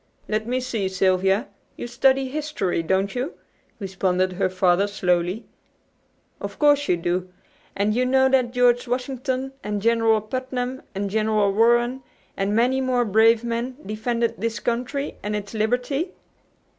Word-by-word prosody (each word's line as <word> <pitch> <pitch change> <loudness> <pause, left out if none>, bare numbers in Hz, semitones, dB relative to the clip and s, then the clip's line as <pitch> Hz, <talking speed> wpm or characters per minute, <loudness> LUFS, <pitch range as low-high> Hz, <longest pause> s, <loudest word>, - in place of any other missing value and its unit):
"Let 215 +1 -1
me 250 +1 0
see, 230 -7 -2
Sylvia. 190 +4 +2 0.3
You - - -5
study 265 +2 +2
history, 280 - -2
don't 190 +4 0
you?" 255 +6 -3 0.4
responded 185 -2 0
her 185 0 0
father 185 +1 +2
slowly. 180 +1 0 0.9
"Of - - -6
course 290 -1 +4
you 175 - +2
do; 180 +2 -2 0.4
and 205 +2 +1
you 250 +3 +1
know 265 +1 +4
that 260 -2 +2
George 245 0 +3
Washington 260 +1 -2
and 210 0 -2
General 225 0 +3
Putnam 255 +3 -4
and 200 +1 -2
General 215 -1 +1
Warren, 240 +4 +3 0.3
and 200 +1 -1
many 255 +3 +2
more 250 -2 +1
brave 220 +2 +4
men, 240 +2 -3
defended 230 +2 -1
this 225 -1 -2
country 250 +4 -2
and 210 +1 -3
its 205 0 -5
liberty?" 250 - -1
230 Hz, 145 wpm, -23 LUFS, 200-255 Hz, 0.9 s, course